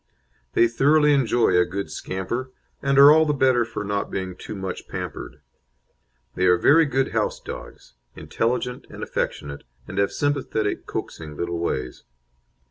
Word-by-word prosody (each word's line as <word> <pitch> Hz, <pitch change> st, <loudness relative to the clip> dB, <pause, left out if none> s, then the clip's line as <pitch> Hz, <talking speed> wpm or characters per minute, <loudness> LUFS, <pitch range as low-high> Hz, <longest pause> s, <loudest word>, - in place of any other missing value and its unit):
They 120 Hz, -, +5 dB
thoroughly 150 Hz, +5 st, +4 dB
enjoy 120 Hz, -6 st, +2 dB
a 90 Hz, -, +5 dB
good 95 Hz, +3 st, -5 dB
scamper, 120 Hz, +8 st, -4 dB, 0.3 s
and 140 Hz, 0 st, +1 dB
are 140 Hz, +1 st, +10 dB
all 160 Hz, +1 st, +6 dB
the 150 Hz, -, +1 dB
better 130 Hz, -3 st, +3 dB
for 110 Hz, -2 st, -5 dB
not 100 Hz, 0 st, -2 dB
being 95 Hz, -2 st, -4 dB
too 100 Hz, -, -8 dB
much 95 Hz, -1 st, -6 dB
pampered. -, -, -7 dB, 0.9 s
They 90 Hz, +1 st, +1 dB
are 90 Hz, 0 st, +5 dB
very 160 Hz, -, +5 dB
good 135 Hz, -1 st, 0 dB
house -, -, -1 dB
dogs, -, -, -10 dB, 0.2 s
intelligent 125 Hz, +2 st, -2 dB
and -, -, -8 dB
affectionate, 70 Hz, 0 st, -4 dB, 0.2 s
and 95 Hz, -, -4 dB
have 100 Hz, -, +2 dB
sympathetic, 140 Hz, -7 st, -1 dB
coaxing 75 Hz, -2 st, -6 dB
little 85 Hz, 0 st, -3 dB
ways. 65 Hz, -7 st, -3 dB
115 Hz, 150 wpm, -23 LUFS, 95-135 Hz, 0.9 s, are